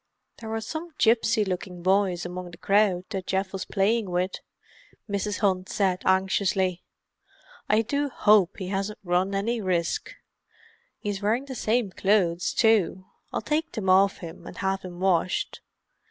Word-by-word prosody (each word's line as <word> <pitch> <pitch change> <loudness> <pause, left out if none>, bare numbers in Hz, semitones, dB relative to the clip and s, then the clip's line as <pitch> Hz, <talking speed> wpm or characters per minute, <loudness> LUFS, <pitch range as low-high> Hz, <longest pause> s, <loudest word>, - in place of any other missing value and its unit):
"There 225 - -7
were 225 0 -2
some 315 +8 -6
gipsy 225 -1 +3
looking 180 -1 -5
boys 190 -2 +2
among 180 0 -6
the 170 - -12
crowd 195 -3 +2
that 190 -3 -4
Geoff 190 0 -1
was 195 - -4
playing 210 +1 +1
with," 180 +1 -1 0.7
Mrs. 205 -1 -2
Hunt 185 -3 +1
said 190 -2 0
anxiously. 190 -1 +1 0.9
"I 215 +2 +4
do 285 +5 -1
hope 205 -6 +4
he 185 -2 -5
hasn't 195 +2 -2
run 185 +2 +1
any 225 +4 -1
risk. 175 -3 -1 0.8
He 205 - -5
is 200 -1 -3
wearing 225 +6 +1
the 270 - -7
same 225 -3 0
clothes, 185 -3 +1
too—I'll 195 -4 +1
take 315 +2 -1
them 190 -5 0
off 195 +1 +4
him, 165 - -10
and - - -10
have 195 0 -1
them 175 -1 -9
washed." 185 -1 0
195 Hz, 155 wpm, -26 LUFS, 185-215 Hz, 0.9 s, I